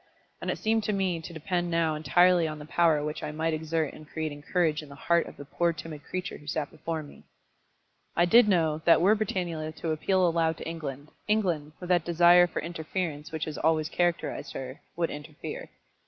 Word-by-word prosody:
And - - -3
it - - -1
seemed 220 0 +1
to 210 - 0
me 190 -4 0
to 160 - -8
depend 175 +2 -2
now 165 -2 +1
entirely 175 +2 +4
on 155 0 -5
the 150 - -9
power 160 -2 +3
which 150 0 -4
I - - -4
might 160 +1 -1
exert 160 -1 -1
in 155 - -11
creating 155 -2 -5
courage 160 -1 +1
in 150 - -12
the 140 - -10
heart 170 +4 +2
of - - -11
the 145 - -9
poor 170 +4 0
timid 155 -2 -8
creature 185 0 -5
who 150 - -16
sat 150 -1 -2
before 160 0 -4
me. 145 - -14 0.9
I 175 - +4
did 230 +6 +6
know 160 -5 +2
that 170 - +7
were 195 +6 +5
Britannula 170 -7 -2
to 165 - -3
appeal 185 +4 +2
aloud 165 -1 +1
to - - -7
England, 150 -3 -6 0.2
England, 175 -9 0
with 180 - -8
that 175 -3 +3
desire 175 +1 +6
for 175 - -4
interference 160 -2 -4
which 160 0 -2
has 155 - -5
always 160 -1 +2
characterised 175 0 -1
her, 130 0 -7
would 170 -1 0
interfere. 150 +1 -7
165 Hz, 205 wpm, -28 LUFS, 155-175 Hz, 0.9 s, that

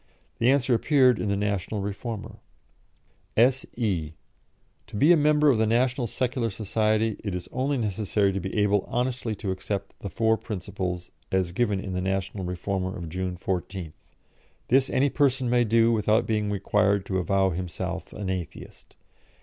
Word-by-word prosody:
The 120 - +4
answer 135 -2 +3
appeared 130 -1 +4
in 105 - -1
the 100 - +1
National 100 0 -1
Reformer: 105 +2 -5 1.0
"S.E. 115 - +1 0.7
To 110 - -10
be 145 +11 +5
a - - +8
member 150 -1 +4
of 115 - +1
the 110 - +3
National 125 +2 +1
Secular 125 -1 -1
Society 110 +1 0
it 100 -4 -3
is 90 -1 -5
only 135 +2 0
necessary 105 -2 0
to 100 - -1
be 95 +3 -4
able 105 -1 +3
honestly 120 -2 -1
to 100 -1 -3
accept 100 +1 -4
the 100 - -5
four 110 +3 +2
principles, 90 -4 -5 0.2
as 95 -2 +1
given 105 0 0
in 95 -1 -5
the 90 - -1
National 95 +1 -2
Reformer 95 +2 -3
of 85 -2 -6
June 90 +1 -3
14th. 90 -2 -4 0.8
This 135 +2 +4
any 140 +1 +2
person 130 -4 +1
may 120 0 +4
do 115 +1 +4
without 110 +1 +2
being 105 -2 0
required 100 0 +1
to 95 -1 -1
avow 95 +1 +2
himself 90 0 -4
an 100 -2 -5
Atheist. 90 -3 -6
105 Hz, 160 wpm, -26 LUFS, 95-120 Hz, 1.0 s, a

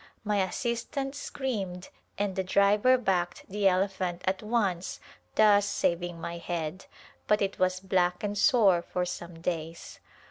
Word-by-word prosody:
My 210 -1 0
assistant 240 +7 -2
screamed 205 -11 -4 0.3
and 200 -2 -1
the 190 - 0
driver 205 +7 +4
backed 180 -7 -1
the 200 0 +1
elephant 185 -2 0
at 190 0 0
once 210 -5 -1 0.4
thus 205 -1 +5
saving 175 -2 -1
my 170 +1 -5
head, 170 +1 -4 0.4
but 210 - +4
it 195 -1 -2
was 185 0 +2
black 180 -1 0
and 205 0 -2
sore 205 - +4
for 180 +1 -2
some 170 -2 -7
days. 165 -1 -4
190 Hz, 140 wpm, -28 LUFS, 175-210 Hz, 0.4 s, thus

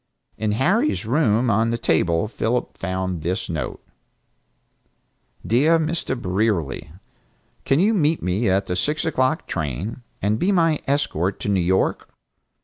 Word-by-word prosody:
In 110 -1 -1
Harry's 190 - +1
room 120 -2 +2
on 110 +3 +2
the 115 - 0
table 85 -2 +1
Philip 115 +2 -2
found 95 -2 -3
this 90 +7 -2
note: 80 -3 -4 1.6
"Dear 145 +9 +4
Mr. 160 -5 -2
Brierly: 90 - -1 0.7
Can 135 - +3
you 210 +5 +3
meet 160 -5 +1
me 95 +5 +1
at 95 +2 +2
the 90 - -2
six 150 - -1
o'clock 135 -1 0
train, 85 - -4 0.2
and 105 +3 0
be 190 - +2
my 165 -5 +3
escort 100 - 0
to - - -2
New 95 -2 +2
York? 95 +2 0
110 Hz, 140 wpm, -22 LUFS, 95-150 Hz, 1.6 s, Dear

